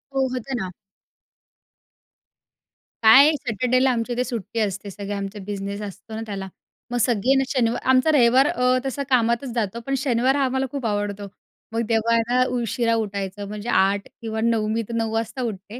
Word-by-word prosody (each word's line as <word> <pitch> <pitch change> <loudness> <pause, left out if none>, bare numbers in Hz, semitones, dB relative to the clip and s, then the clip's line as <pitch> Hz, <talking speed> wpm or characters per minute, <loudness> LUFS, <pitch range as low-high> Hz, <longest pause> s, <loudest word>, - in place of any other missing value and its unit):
हो, 265 -1 +2
होतं 255 +1 -4
ना. 185 -1 -4 2.3
काय, 270 +7 +8
सॅटर्डेला 255 +2 +1
आमच्या 240 0 -2
इथे 245 +1 0
सुट्टी 230 -2 -4
असते. 200 -1 -2
सगळे 200 +1 -6
आमचा 200 +1 -5
बिझनेस 200 0 -4
असतो 210 +2 -9
ना 220 - -4
त्याला. 195 -3 -5 0.4
मग 245 - 0
सगळे 240 +2 +2
ना, 270 - +3
शनिवार 240 -4 +1
आमचा 260 +4 +4
रविवार 260 -1 +5
अ, 250 0 +2
तसा 275 +1 -2
कामातच 235 0 +1
जातो, 230 -1 -1
पण 275 - -2
शनिवार 260 0 +1
हा, 280 - +2
आम्हाला 265 +1 0
खूप 275 -4 -4
आवडतो. 205 -1 -2 0.5
मग 230 - 0
तेव्हा 225 0 +2
आहे 230 - +4
ना, 250 +1 +4
उशिरा 235 0 0
उठायचं. 200 -2 -3
म्हणजे 210 +3 -6
8:00 200 -2 +2
किंवा 220 -1 -3
9:00. 225 -2 +1
मी 225 +1 0
तर - - -5
9:00 225 -1 -1
वाजता 225 +3 -2
उठते. 215 0 -5
230 Hz, 175 wpm, -23 LUFS, 205-255 Hz, 2.3 s, काय